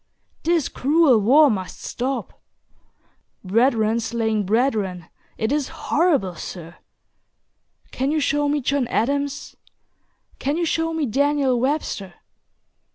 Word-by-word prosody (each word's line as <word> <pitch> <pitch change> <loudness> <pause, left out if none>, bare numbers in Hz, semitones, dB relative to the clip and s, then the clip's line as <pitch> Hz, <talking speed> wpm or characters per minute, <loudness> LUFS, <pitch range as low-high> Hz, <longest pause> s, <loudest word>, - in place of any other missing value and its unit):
This 335 -3 +1
cruel 290 -3 +3
war 275 +7 +5
must 190 -3 -5
stop. 260 +2 -4 1.0
Brethren 225 +2 +2
slaying 220 -3 -1
brethren, 210 -6 0 0.3
it 220 +2 -1
is 290 -2 0
horrible, 305 - 0
Sir. 170 -1 -9 1.1
Can 265 +2 -1
you 310 +1 +1
show 290 0 +1
me 295 0 0
John 275 -1 0
Adams? 280 +5 -2 0.8
Can 285 +4 -1
you 345 - 0
show 325 0 0
me 320 -2 -1
Daniel 275 0 +1
Webster? 245 - -2
265 Hz, 110 wpm, -22 LUFS, 220-290 Hz, 1.1 s, war